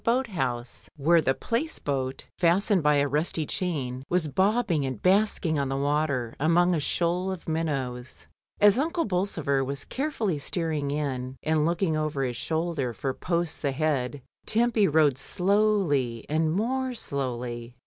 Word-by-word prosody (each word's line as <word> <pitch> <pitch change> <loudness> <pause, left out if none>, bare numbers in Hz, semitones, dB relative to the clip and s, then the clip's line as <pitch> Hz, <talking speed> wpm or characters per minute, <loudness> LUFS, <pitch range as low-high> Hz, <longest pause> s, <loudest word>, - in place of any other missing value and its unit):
DYMOND. 235 +2 +3
boat 260 -1 -2
house, 120 -7 -3
where 165 +4 +4
the 135 -3 +1
Place 270 +8 -2
boat 135 -2 -3
fastened 185 +3 +3
by 150 0 +4
a 145 0 +3
rusty 155 +2 0
chain 135 -8 -2
was 175 -3 +2
bobbing 190 - +1
and 130 -5 -3
basking 185 - +2
on 140 -1 -1
the 135 - -1
water 140 -4 0
among 175 +4 +3
a 165 - +1
shoal 175 +5 0
of 185 -3 -7
minnows. 135 -6 -3 0.3
As 205 +3 +6
Uncle 330 +3 0
Bolsover 175 - 0
was 140 +1 -4
carefully 230 - -2
steering 155 -2 -2
in, 135 -3 -3
and 155 0 +2
looking 170 -1 +1
over 155 -3 -1
his 125 -2 -2
shoulder 160 -1 -2
for 135 +3 -2
posts 170 +2 -2
ahead, 140 -2 -1 0.2
Tempy 225 -2 +3
rowed 150 -3 +3
slowly 180 - +1
and 155 +1 +1
more 255 +7 -1
slowly. 125 - -4
155 Hz, 150 wpm, -27 LUFS, 135-185 Hz, 0.3 s, As